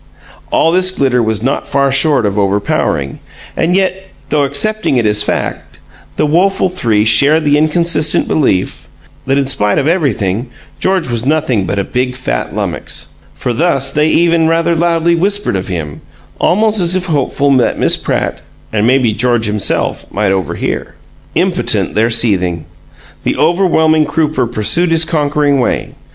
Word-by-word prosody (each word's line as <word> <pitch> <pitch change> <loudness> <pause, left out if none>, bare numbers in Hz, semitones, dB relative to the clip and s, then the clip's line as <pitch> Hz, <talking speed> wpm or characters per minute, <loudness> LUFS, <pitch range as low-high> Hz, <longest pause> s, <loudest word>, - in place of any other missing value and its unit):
All 165 - +2
this 185 +1 +3
glitter 135 -9 0
was 110 -1 -1
not 135 - -2
far 140 0 +1
short 140 -3 +3
of 100 0 -1
overpowering; 100 -8 -1 0.4
and 170 +2 0
yet, 190 0 -1 0.2
though 145 -2 +1
accepting 215 0 +1
it 120 - +1
as 105 0 +3
fact, 105 - -4 0.4
the - - +1
woeful 185 +5 +1
three 115 -12 0
shared 145 +8 +4
the 145 0 +3
inconsistent 155 0 +1
belief 100 -11 -1 0.4
that 135 +1 +1
in 140 - +1
spite 105 -6 0
of 140 - 0
everything 120 - -1 0.3
George 190 -2 0
was 120 -2 -2
nothing 130 -9 0
but 100 - -2
a 100 - 0
big, 125 +4 -2
fat - - -4
lummox. - - -3 0.3
For 125 - -3
thus 135 -1 0
they 150 +1 +2
even 165 -1 +2
rather 165 +1 +1
loudly 170 0 +1
whispered 200 - 0
of 95 - -3
him 80 -6 -5 0.4
almost 215 +3 +2
as 175 +1 +3
if 185 -1 -1
hopeful 140 -3 0
that 125 - +1
Miss - - +3
Pratt, - - -3 0.3
and 110 +1 +1
mayhap 125 -4 +2
George 120 -1 +1
himself, 105 -1 -2
might 100 -1 0
overhear. 95 -4 -3 0.4
Impotent - - 0
their 110 +2 +1
seething! 90 -8 +1 0.6
The - - -1
overwhelming 160 -2 +2
Crooper 150 -6 -1
pursued 165 - +2
his 165 0 +3
conquering 145 -3 0
way. 125 - -1
140 Hz, 155 wpm, -13 LUFS, 110-165 Hz, 0.6 s, shared